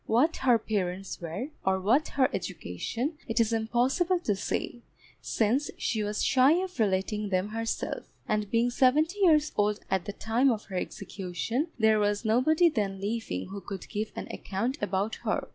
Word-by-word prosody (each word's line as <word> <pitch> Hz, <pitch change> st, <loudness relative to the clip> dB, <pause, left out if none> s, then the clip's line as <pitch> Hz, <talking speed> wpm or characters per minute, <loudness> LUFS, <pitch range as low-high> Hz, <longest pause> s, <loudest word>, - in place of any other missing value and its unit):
What 265 Hz, +10 st, +3 dB
her 250 Hz, -3 st, +4 dB
parents 195 Hz, -4 st, -3 dB
were, 170 Hz, -, -4 dB
or 190 Hz, 0 st, +2 dB
what 245 Hz, +11 st, +3 dB
her 260 Hz, -2 st, +5 dB
education 230 Hz, -, -4 dB
it 230 Hz, 0 st, 0 dB
is 230 Hz, 0 st, +2 dB
impossible 250 Hz, +11 st, +1 dB
to 210 Hz, -, 0 dB
say, 240 Hz, +4 st, -3 dB, 0.4 s
since 245 Hz, +7 st, +1 dB
she 220 Hz, -, -1 dB
was 210 Hz, 0 st, -1 dB
shy 265 Hz, +3 st, +5 dB
of 365 Hz, -1 st, -2 dB
relating 210 Hz, 0 st, 0 dB
them 185 Hz, +1 st, 0 dB
herself; 225 Hz, +1 st, -3 dB, 0.2 s
and 210 Hz, -1 st, 0 dB
being 235 Hz, +2 st, +2 dB
seventy 305 Hz, +10 st, +3 dB
years 310 Hz, -6 st, +4 dB
old 210 Hz, 0 st, +1 dB
at 190 Hz, -2 st, +1 dB
the 205 Hz, -, -4 dB
time 230 Hz, +6 st, +2 dB
of 220 Hz, -4 st, -1 dB
her 190 Hz, -, -8 dB
execution, 200 Hz, -, -3 dB
there 220 Hz, -2 st, +4 dB
was 205 Hz, +1 st, 0 dB
nobody 285 Hz, +10 st, +4 dB
then 205 Hz, -, -1 dB
living 200 Hz, -, -3 dB
who 200 Hz, 0 st, -6 dB
could 190 Hz, +1 st, -7 dB
give 215 Hz, 0 st, -3 dB
an -, -, -5 dB
account 235 Hz, +9 st, -3 dB
about 205 Hz, +2 st, -1 dB
her. -, -, -1 dB
220 Hz, 170 wpm, -28 LUFS, 200-260 Hz, 0.4 s, her